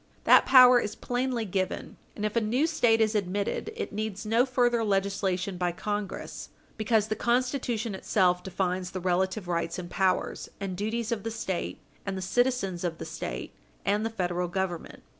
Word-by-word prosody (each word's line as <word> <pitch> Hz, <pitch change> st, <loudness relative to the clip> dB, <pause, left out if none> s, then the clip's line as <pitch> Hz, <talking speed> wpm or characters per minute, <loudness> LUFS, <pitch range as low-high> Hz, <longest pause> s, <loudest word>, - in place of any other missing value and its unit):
That -, -, +6 dB
power 255 Hz, -2 st, +9 dB
is 210 Hz, -2 st, -3 dB
plainly 245 Hz, -2 st, -1 dB
given, 190 Hz, -1 st, -3 dB, 0.2 s
and 210 Hz, -, -3 dB
if 215 Hz, -, -2 dB
a 230 Hz, -, +3 dB
new 240 Hz, +8 st, +2 dB
State 240 Hz, -8 st, +3 dB
is 215 Hz, 0 st, +3 dB
admitted, 205 Hz, -, -1 dB
it 460 Hz, -, -4 dB
needs 215 Hz, -1 st, -3 dB
no 230 Hz, +4 st, +3 dB
further 240 Hz, -2 st, +2 dB
legislation 195 Hz, -2 st, 0 dB
by 175 Hz, -1 st, 0 dB
Congress, 205 Hz, +2 st, -4 dB, 0.3 s
because 215 Hz, -1 st, +2 dB
the 215 Hz, -, -1 dB
Constitution 240 Hz, -2 st, 0 dB
itself 185 Hz, -2 st, +2 dB
defines 185 Hz, -1 st, -2 dB
the 185 Hz, -, -5 dB
relative 185 Hz, +2 st, 0 dB
rights 170 Hz, -1 st, -1 dB
and 175 Hz, -1 st, -7 dB
powers 190 Hz, -1 st, 0 dB
and 195 Hz, -2 st, -3 dB
duties 220 Hz, +4 st, -2 dB
of 230 Hz, -3 st, -1 dB
the 225 Hz, -, -3 dB
State, 215 Hz, -5 st, -3 dB, 0.3 s
and 195 Hz, -1 st, -3 dB
the -, -, -4 dB
citizens 195 Hz, -4 st, 0 dB
of 170 Hz, -2 st, -2 dB
the -, -, -6 dB
State, -, -, -5 dB, 0.3 s
and 205 Hz, +2 st, +2 dB
the 225 Hz, -, 0 dB
Federal 180 Hz, -4 st, -1 dB
Government. 175 Hz, -2 st, -4 dB
205 Hz, 175 wpm, -28 LUFS, 185-230 Hz, 0.3 s, power